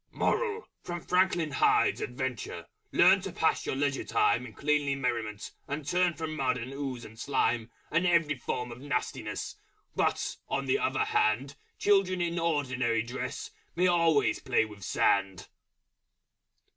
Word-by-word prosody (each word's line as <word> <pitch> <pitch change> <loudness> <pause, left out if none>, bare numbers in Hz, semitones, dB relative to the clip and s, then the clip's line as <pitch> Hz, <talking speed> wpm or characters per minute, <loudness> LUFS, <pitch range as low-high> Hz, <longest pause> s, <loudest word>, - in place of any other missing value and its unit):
MORAL 450 -2 0
From 175 0 -5
Franklin 180 -4 +2
Hyde's 140 - +3
adventure, 125 -2 -4 0.3
learn - - +6
To - - -5
pass - - +1
your - - -1
Leisure 140 0 0
Time 125 +1 +2
In 110 - -12
Cleanly 145 +2 +1
Merriment, 115 -5 -3 0.2
and 145 0 -4
turn 175 0 +2
From 160 -1 -4
Mud 130 -3 +1
and 125 +2 -6
Ooze 135 -4 -4
and 110 +1 -13
Slime 120 -3 0 0.2
And 170 +3 +2
every 170 -4 +3
form 125 -2 -4
of 120 - -9
Nastiness 140 -3 -3 0.4
But, - - 0
on - - -1
the - - +2
other - - +1
Hand, 120 +6 +1 0.2
Children 195 -3 +3
in 170 0 -1
ordinary 130 -8 0
Dress 125 +2 -5 0.2
May 180 +2 +2
always 170 -4 +3
play 125 -3 +2
with 105 -2 -12
Sand. 95 0 +1
140 Hz, 145 wpm, -29 LUFS, 120-170 Hz, 0.4 s, learn